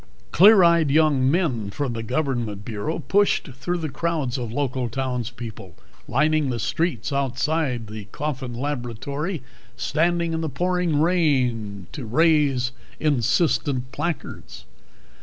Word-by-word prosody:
Clear 200 +2 +7
eyed 170 -3 +4
young 145 -3 +3
men 135 - 0
from 130 +4 -3
the 115 - -4
Government 120 -5 -2
Bureau 115 +8 -3
pushed 200 0 +1
through 160 +6 -3
crowds 155 -4 -2
of 120 -3 -4
local 130 -2 -1
townspeople, 120 -6 -5 0.3
lining 150 +2 +2
the 120 - -2
streets 145 - -1
outside 135 -1 0
the 105 -1 -8
Coffin 130 +1 -4
laboratory, 140 - -3 0.3
standing 170 +5 +1
in 160 - -1
pouring 175 +1 0
rain 125 - +1
to 140 - -6
raise 145 -2 +3 0.3
insistent 140 -2 +1
placards. 150 +4 -5
140 Hz, 115 wpm, -23 LUFS, 120-160 Hz, 0.3 s, Clear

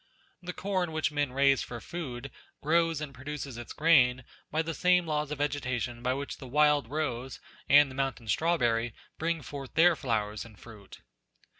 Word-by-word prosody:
The 180 0 -5
corn 185 -3 -2
which 155 -1 0
men 145 -3 -1
raise 135 0 +3
for 120 - -6
food, 135 -4 -6 0.3
grows 165 0 +2
and 145 -3 -5
produces 140 0 -6
its 120 0 -8
grain 130 -6 +4 0.3
by 160 +2 0
the 165 0 -3
same 180 +1 +3
laws 150 -2 -1
of 150 - -4
vegetation 125 -5 -2
by 125 +1 0
which 140 +1 -5
the 130 - -10
wild 150 -1 +3
rose 135 -4 -3 0.3
and 145 -1 +7
the - - -9
mountain 135 -4 -2
strawberry 120 - +1 0.2
bring 165 -1 -1
forth 140 -2 -8
their 170 +1 +6
flowers 105 -7 -2
and 110 -3 -14
fruit. 105 -4 -13
140 Hz, 170 wpm, -29 LUFS, 125-155 Hz, 0.3 s, and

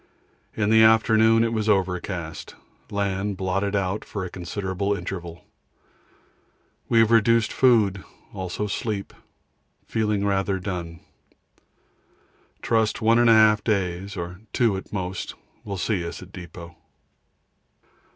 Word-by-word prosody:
In 105 -1 +1
the 110 0 +6
afternoon 110 0 +5
it 115 0 0
was 110 -1 -1
overcast; 90 -4 -2 0.3
land 100 -1 -2
blotted 95 +2 -1
out 100 +1 -1
for 100 -3 -5
a 90 - -8
considerable 95 +2 -3
interval. 85 -2 -7 1.4
We 115 - +2
have 115 0 +5
reduced 115 0 +3
food, 105 -7 +3 0.3
also 95 +2 -4
sleep; 100 0 -3 0.7
feeling 105 -2 -1
rather 95 -1 0
done. 90 -3 -5 1.6
Trust 110 -2 +1
1 115 +1 +4
1/2 110 -2 +5
days 95 -2 -2
or 90 +2 -6
2 115 -5 +2
at 95 - -8
most 95 -2 -4 0.3
will 100 -2 -5
see 95 -1 -1
us 85 - -6
at 90 - -15
depot. 85 -2 -10
100 Hz, 115 wpm, -24 LUFS, 90-110 Hz, 1.6 s, the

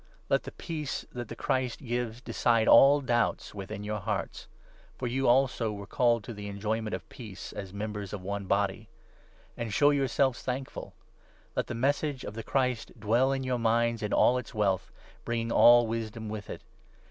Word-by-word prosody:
Let - - +3
the - - -5
15 - - -14
Peace 155 -4 -3
that 120 -1 -6
the 115 - -7
Christ 130 0 -1
gives 120 -3 -3
decide 115 -1 +1
all 145 +1 +7
doubts 120 -3 0
within 100 0 -6
your 105 0 -3
hearts; 100 - -4 0.5
for 125 - -4
you 130 +2 0
also 120 -3 +3
were 100 -1 -7
called 120 0 +2
to 115 - -7
the 105 -1 -7
enjoyment 110 +2 -2
of - - -9
peace 110 -8 -9
as 95 -2 -6
members 105 -1 -5
of 100 -3 -6
one 100 +1 -3
Body. 100 +2 0 0.7
And 115 -2 -4
show 145 +8 +4
yourselves 135 -2 +1
thankful. 130 +1 -5 0.6
Let - - -1
the 120 - -4
Message 140 +2 0
16 - - -7
of - - -11
the 115 - -5
Christ 125 -2 -1
dwell 120 +6 +2
in 135 -1 -1
your 125 -1 -1
minds 115 0 +1
in 105 -1 -2
all 125 +1 +4
its 115 - -10
wealth, 95 -3 0 0.3
bringing 115 -1 -2
all 120 0 +7
wisdom 110 -1 -4
with 105 -1 -6
it. - - -7
115 Hz, 185 wpm, -29 LUFS, 105-125 Hz, 0.7 s, all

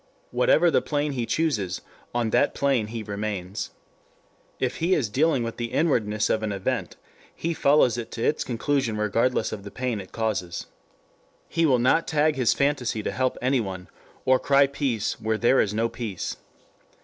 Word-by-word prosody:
Whatever - - +4
the - - +3
plane 145 0 -1
he 120 -4 -2
chooses, 110 - 0 0.3
on 120 -2 -1
that - - +2
plane 135 -6 +1
he 115 0 -5
remains. 100 -2 -4 0.9
If 130 -1 -1
he 175 +3 +2
is 125 -8 0
dealing 140 +2 +2
with 115 0 -5
the 120 -1 -3
inwardness 110 -10 +1
of 110 - +1
an 110 -1 -2
event 100 -1 -2 0.4
he 170 +1 -2
follows 140 -6 +3
it 115 - -6
to 115 - -4
its - - +1
conclusion 125 -1 -1
regardless 110 +3 +1
of 110 - -5
the 100 - -7
pain 125 -2 -3
it 95 - -13
causes. 100 -6 -2 0.8
He 165 -1 +2
will 130 -3 +4
not 130 +7 +3
tag 155 0 +2
his 125 -4 +3
fantasy 135 -6 0
to - - -2
help 130 +1 0
anyone, 105 -9 -1 0.4
or 130 0 +4
cry 140 0 +4
peace 135 -6 -2
where 110 0 0
there 120 +4 +4
is 100 - 0
no 110 +2 +1
peace. 110 -6 -5
120 Hz, 175 wpm, -25 LUFS, 110-140 Hz, 0.9 s, Whatever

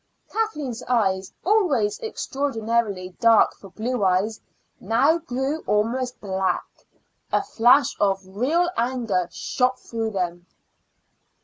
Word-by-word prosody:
Kathleen's 300 - -2
eyes, 195 -6 +1
always 305 - +2
extraordinarily 230 - -2
dark 230 -2 +5
for 195 - -14
blue 230 +4 -2
eyes, 195 +4 +1 0.4
now 270 - +3
grew 275 0 -2
almost 245 +4 0
black. 190 -1 -1 0.7
A - - +2
flash 255 - +4
of 195 -1 +2
real 260 - +1
anger 230 -8 0
shot 255 +6 0
through 225 -1 -3
them. 175 -3 -3
230 Hz, 105 wpm, -24 LUFS, 200-265 Hz, 0.7 s, dark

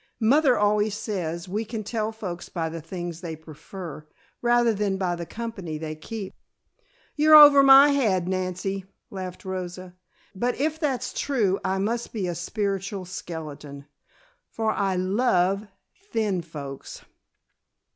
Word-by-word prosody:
"Mother 260 +3 +4
always 210 0 +2
says 170 -6 -4
we 205 +5 -2
can 220 0 -5
tell 220 0 -2
folks 185 -6 -7
by 165 -2 -2
the 165 0 -6
things 170 0 -6
they 165 -3 -5
prefer, 160 +1 -10 0.3
rather 240 -1 +3
than 200 -2 -1
by 180 -2 -1
the 170 -1 -6
company 215 -9 -5
they 155 0 -5
keep." 195 +5 -7 0.8
"You're 310 +1 +6
over 290 -2 +10
my 275 +1 +8
head, 210 -11 +1
Nancy," 185 +1 -2 0.3
laughed 185 -1 -7
Rosa. 185 -1 -5 0.4
"But 240 +6 -1
if 310 +2 0
that's 280 -6 -1
true 210 -9 0
I 190 - 0
must 230 +5 -2
be 210 -5 -2
a 175 - -2
spiritual 195 +2 -3
skeleton, 150 -6 -8 0.6
for 220 -1 -1
I 195 -2 0
love 195 0 +1 0.4
thin 210 -5 0
folks." 145 -4 -9
195 Hz, 135 wpm, -25 LUFS, 175-225 Hz, 0.8 s, over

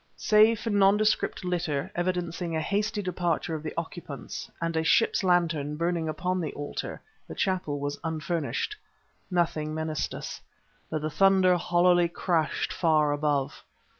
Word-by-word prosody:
Save 215 +1 +5
for 225 - -2
nondescript 205 0 +2
litter, 170 -6 -1
evidencing 175 -1 -2
a - - +1
hasty 205 +5 -1
departure 175 -2 -1
of 155 - -3
the 155 - -6
occupants, 165 -4 -6
and 165 0 -2
a 160 - +1
ship's 225 +5 +3
lantern 165 -5 +1
burning 170 -1 0
upon 180 +3 -1
the 155 - -3
altar, 145 0 -5 0.3
the - - -8
chapel 180 -7 -1
was 145 0 -3
unfurnished. 165 - -2 0.5
Nothing 160 -4 0
menaced 160 -1 -2
us, - - -7 0.5
but 155 -1 -3
the 155 - -2
thunder 190 +1 +5
hollowly 175 0 +3
crashed 170 -2 -1
far 155 -3 +3
above. 145 -2 -1
170 Hz, 140 wpm, -27 LUFS, 155-185 Hz, 0.5 s, Save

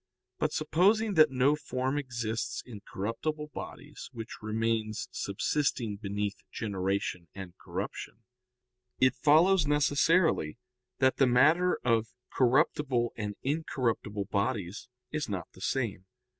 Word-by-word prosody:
But - - +1
supposing 200 +8 +2
that 155 -3 +6
no 135 +3 +3
form 130 -1 -2
exists 120 -2 -3
in 110 -5 -10
corruptible 150 +9 -3
bodies 150 0 -8
which 115 -3 -8
remains 110 0 -1
subsisting 115 +1 -1
beneath 100 0 -2 0.2
generation 95 -4 -2
and 95 -3 -8
corruption, 115 - -6 0.8
it 130 0 +5
follows 160 +5 +4
necessarily 145 - +2 0.4
that 130 0 +3
the 135 - +5
matter 155 +9 +4
of 115 -2 +2 0.3
corruptible 125 -1 +2
and 105 -2 -4
incorruptible 125 -8 -1
bodies 100 -2 -2 0.2
is 150 -4 -2
not 95 -5 -4
the 95 - -16
same. 110 -6 -2
125 Hz, 115 wpm, -30 LUFS, 105-145 Hz, 0.8 s, that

